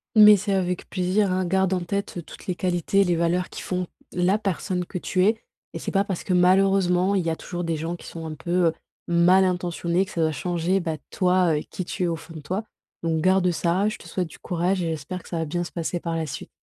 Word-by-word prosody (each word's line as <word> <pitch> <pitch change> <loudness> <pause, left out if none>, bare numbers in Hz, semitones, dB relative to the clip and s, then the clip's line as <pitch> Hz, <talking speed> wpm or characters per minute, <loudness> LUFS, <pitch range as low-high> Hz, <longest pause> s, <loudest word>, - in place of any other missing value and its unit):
Mais 210 -1 +9
c'est 200 +1 -2
avec 180 -2 -1
plaisir, 185 +1 +1
hein, 185 0 0
garde 190 +1 +2
en 185 - +1
tête 200 0 -3
toutes - - -12
les 185 - -1
qualités, 180 +2 +1
les 175 -3 +2
valeurs 170 +2 +1
qui - - -8
font 180 -1 -2 0.3
la 180 +3 +2
personne 190 -3 -2
que 180 - -5
tu 185 +1 +1
es 220 +3 +2 0.3
et - - -5
c'est - - -4
pas 195 0 +2
parce 195 -4 -3
que 185 - -1
malheureusement, 185 +1 +4
il 190 -3 +1
y 165 - 0
a 160 - -1
toujours 175 +1 -5
des 165 -1 -1
gens 165 +3 -3
qui - - -13
sont 165 -1 -7
un 155 - -5
peu, 175 +3 +1
heu, 165 - +3 0.4
mal 175 +2 +5
intentionnés 175 0 0
que 190 - -12
ça 170 - -2
va 160 -1 +3
changer, 175 +5 0
bah, 160 -3 -3
toi, 180 -3 +3
heu, - - 0
qui 185 - -5
tu - - -4
es - - +2
au 165 - -1
fond 165 +1 -12
de 160 - -7
toi, 185 +8 -3 0.4
donc 165 -1 0
garde 185 0 +4
ça, 175 +4 +1
je 215 - -3
te - - -15
souhaite 180 -3 -2
du - - -14
courage 180 +2 0
et 170 - -1
j'espère 160 +4 -5
que - - -15
ça 170 - -2
va 165 - 0
bien 175 +3 -2
se - - -9
passer 170 +1 -2
par 170 -1 -3
la 165 -1 -1
suite. 145 - -7
180 Hz, 260 wpm, -24 LUFS, 170-190 Hz, 0.4 s, Mais